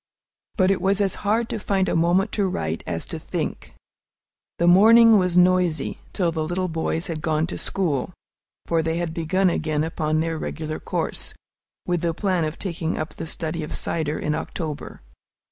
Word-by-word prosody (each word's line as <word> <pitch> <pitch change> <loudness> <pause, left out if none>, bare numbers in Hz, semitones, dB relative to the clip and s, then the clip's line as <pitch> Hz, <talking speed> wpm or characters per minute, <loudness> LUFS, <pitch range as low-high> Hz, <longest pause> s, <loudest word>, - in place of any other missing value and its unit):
But 185 -2 +4
it 195 - 0
was 195 +2 +2
as 195 -2 +2
hard 220 +3 +1
to 220 - -3
find 195 -1 0
a - - 0
moment 175 +5 +2
to 200 -2 +1
write 80 - -3
as 85 -2 -3
to - - -6
think. - - -4 0.8
The 170 - +1
morning 220 +5 +7
was 180 -1 +1
noisy, 180 -4 +3
till 175 -4 0
the 160 -1 -2
little 180 +3 -1
boys 165 0 -2
had 160 -2 -4
gone 155 0 +1
to 170 - -5
school; 165 -7 -1 0.5
for 165 -1 +1
they 160 +1 -1
had 170 -2 -2
begun 180 +3 +1
again 155 -2 0
upon 155 -1 -1
their 165 0 -1
regular 155 0 -4
course, - - -3 0.5
with 175 -2 0
the 170 -2 0
plan 185 -5 +1
of 155 +1 -4
taking 170 -3 -3
up 155 - -4
the - - -6
study 160 0 -4
of 150 - -5
cider 155 -2 -1
in 150 - -1
October. 155 0 -5
170 Hz, 180 wpm, -23 LUFS, 155-185 Hz, 0.8 s, morning